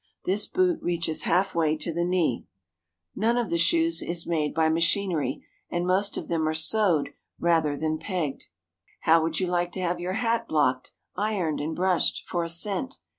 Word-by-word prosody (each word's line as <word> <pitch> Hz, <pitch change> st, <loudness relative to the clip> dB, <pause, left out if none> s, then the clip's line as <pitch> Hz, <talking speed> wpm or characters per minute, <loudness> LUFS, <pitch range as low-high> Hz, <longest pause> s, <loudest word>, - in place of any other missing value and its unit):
This 205 Hz, +3 st, +2 dB
boot 365 Hz, -3 st, +1 dB
reaches 170 Hz, -2 st, -1 dB
half 190 Hz, +1 st, +2 dB
way 160 Hz, -2 st, +1 dB
to 160 Hz, +2 st, -3 dB
the 170 Hz, +1 st, 0 dB
knee. 175 Hz, -8 st, 0 dB, 0.7 s
None 230 Hz, +3 st, +1 dB
of 240 Hz, -2 st, -1 dB
the 170 Hz, -, +2 dB
shoes 330 Hz, -, +3 dB
is 170 Hz, -1 st, -2 dB
made 155 Hz, -3 st, 0 dB
by 160 Hz, -1 st, +2 dB
machinery, 165 Hz, -3 st, 0 dB, 0.2 s
and 175 Hz, 0 st, -1 dB
most 190 Hz, +3 st, +1 dB
of -, -, -5 dB
them 160 Hz, -2 st, 0 dB
are 155 Hz, -, -1 dB
sewed 170 Hz, -1 st, +2 dB, 0.3 s
rather 160 Hz, -4 st, +2 dB
than 155 Hz, +1 st, -1 dB
pegged. 165 Hz, -5 st, -3 dB, 0.5 s
How 165 Hz, +1 st, +5 dB
would 160 Hz, 0 st, -1 dB
you 185 Hz, -, +1 dB
like 175 Hz, 0 st, -1 dB
to 190 Hz, -, -4 dB
have 175 Hz, -1 st, -1 dB
your 180 Hz, +1 st, -3 dB
hat 230 Hz, +1 st, 0 dB
blocked, 130 Hz, -4 st, +1 dB, 0.2 s
ironed, 190 Hz, -7 st, -1 dB
and 160 Hz, +2 st, -3 dB
brushed 180 Hz, -1 st, +1 dB
for 175 Hz, -1 st, -2 dB
a 165 Hz, -, -4 dB
cent? 205 Hz, +10 st, 0 dB
175 Hz, 180 wpm, -26 LUFS, 160-195 Hz, 0.7 s, How